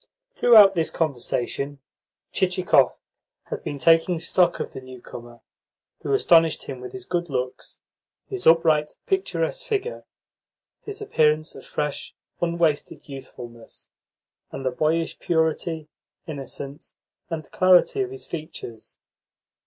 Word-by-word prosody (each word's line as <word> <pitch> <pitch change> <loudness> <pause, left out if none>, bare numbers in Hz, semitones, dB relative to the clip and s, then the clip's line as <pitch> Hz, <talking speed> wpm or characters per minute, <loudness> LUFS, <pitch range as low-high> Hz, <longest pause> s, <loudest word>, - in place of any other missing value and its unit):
Throughout 215 - +7
this 165 -3 0
conversation, 140 -1 -2 0.5
Chichikov 180 -8 +2 0.5
had - - -4
been 145 - -4
taking 165 +3 +4
stock 175 +1 +2
of - - -4
the 135 - -7
newcomer, 120 -2 -11 0.6
who - - -3
astonished 165 - +4
him 130 -2 -7
with 125 - -7
his 190 -1 -8
good 175 -2 -2
looks, 125 -2 -4 0.4
his 390 -2 -4
upright, 160 -2 +4
picturesque - - -1
figure, 455 -1 -3 0.8
his 420 0 -7
appearance 155 - +2
of - - -12
fresh, 150 -1 -3 0.3
unwasted 170 -3 0
youthfulness, 120 -4 -11 0.6
and 135 0 -6
the 130 - +1
boyish 160 +5 0
purity, 160 -1 0 0.4
innocence, 140 0 -8 0.3
and 160 -4 -5
clarity 185 - +4
of 385 - -1
his 400 0 -9
features. 150 -8 -8
160 Hz, 115 wpm, -24 LUFS, 140-185 Hz, 0.8 s, Throughout